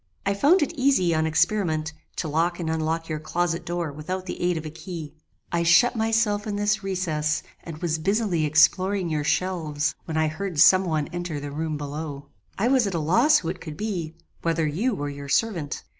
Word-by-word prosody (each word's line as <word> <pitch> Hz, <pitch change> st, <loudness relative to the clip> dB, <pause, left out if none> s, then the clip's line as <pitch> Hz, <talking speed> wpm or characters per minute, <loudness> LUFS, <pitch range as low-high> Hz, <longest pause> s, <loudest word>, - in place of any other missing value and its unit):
"I 200 Hz, -, +2 dB
found 295 Hz, -, +4 dB
it 295 Hz, -, -3 dB
easy, 260 Hz, -, +2 dB
on 160 Hz, 0 st, +1 dB
experiment, 160 Hz, -2 st, +1 dB, 0.2 s
to -, -, -3 dB
lock 165 Hz, +4 st, 0 dB
and 160 Hz, -2 st, -2 dB
unlock 160 Hz, +1 st, -1 dB
your 155 Hz, -1 st, -3 dB
closet 170 Hz, +1 st, -1 dB
door 170 Hz, -2 st, -2 dB
without 185 Hz, +6 st, -5 dB
the 180 Hz, -, -6 dB
aid 175 Hz, -1 st, +1 dB
of 160 Hz, -, -5 dB
a 155 Hz, -, -5 dB
key. 165 Hz, -2 st, -7 dB, 0.4 s
I 170 Hz, -, +1 dB
shut 175 Hz, +9 st, +5 dB
myself 220 Hz, -2 st, +1 dB
in 205 Hz, -, -2 dB
this 205 Hz, +1 st, +1 dB
recess, 160 Hz, -6 st, -1 dB, 0.2 s
and 165 Hz, -2 st, -7 dB
was 160 Hz, -2 st, 0 dB
busily 195 Hz, -2 st, +1 dB
exploring 185 Hz, +5 st, +3 dB
your 150 Hz, -2 st, -1 dB
shelves, 155 Hz, -2 st, 0 dB
when 160 Hz, -1 st, -3 dB
I 160 Hz, -, +3 dB
heard 165 Hz, +1 st, -4 dB
some 185 Hz, +3 st, +7 dB
one 155 Hz, -4 st, -1 dB
enter 175 Hz, -3 st, -4 dB
the 145 Hz, 0 st, -6 dB
room 155 Hz, +1 st, -3 dB
below. 145 Hz, 0 st, -6 dB, 0.3 s
I 215 Hz, -, +1 dB
was 255 Hz, -4 st, +3 dB
at 190 Hz, -, -3 dB
a -, -, 0 dB
loss 235 Hz, -, +4 dB
who 165 Hz, -, -3 dB
it 180 Hz, +1 st, -5 dB
could 155 Hz, -3 st, -8 dB
be, 180 Hz, -7 st, -3 dB, 0.3 s
whether 165 Hz, -1 st, 0 dB
you 200 Hz, -, 0 dB
or 145 Hz, -5 st, -3 dB
your 140 Hz, 0 st, -7 dB
servant. 170 Hz, -4 st, 0 dB
170 Hz, 205 wpm, -25 LUFS, 155-195 Hz, 0.4 s, some